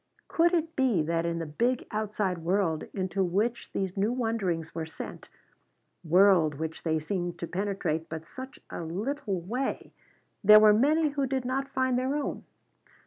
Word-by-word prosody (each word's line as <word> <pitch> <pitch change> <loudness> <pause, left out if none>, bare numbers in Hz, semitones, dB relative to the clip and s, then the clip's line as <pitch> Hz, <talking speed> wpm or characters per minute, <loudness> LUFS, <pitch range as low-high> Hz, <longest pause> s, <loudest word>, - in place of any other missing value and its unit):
Could 340 +2 +3
it 330 -1 -1
be 245 - +2
that 165 +1 0
in 170 0 -1
the 165 - -3
big 235 +12 0
outside 210 -4 -1
world 170 -2 0
into 190 0 -1
which 210 +7 -1
these 190 -2 -2
new 205 +3 +1
wonderings 205 -10 -1
were 160 -1 -4
sent, 160 - -9 0.7
world 175 -3 +5
which 160 +2 -5
they 160 -1 0
seemed 175 +2 -3
to - - -4
penetrate 180 -4 -2
but 160 0 -6
such 260 +2 -9
a - - -5
little 200 - -3
way, 245 +10 -3 0.5
there 210 +1 +9
were 215 -1 +7
many 300 +7 +3
who 280 -1 -1
did 260 -1 -2
not 270 +2 -1
find 260 -2 +1
their 260 +3 -1
own? 295 -2 -3
200 Hz, 165 wpm, -28 LUFS, 170-255 Hz, 0.7 s, there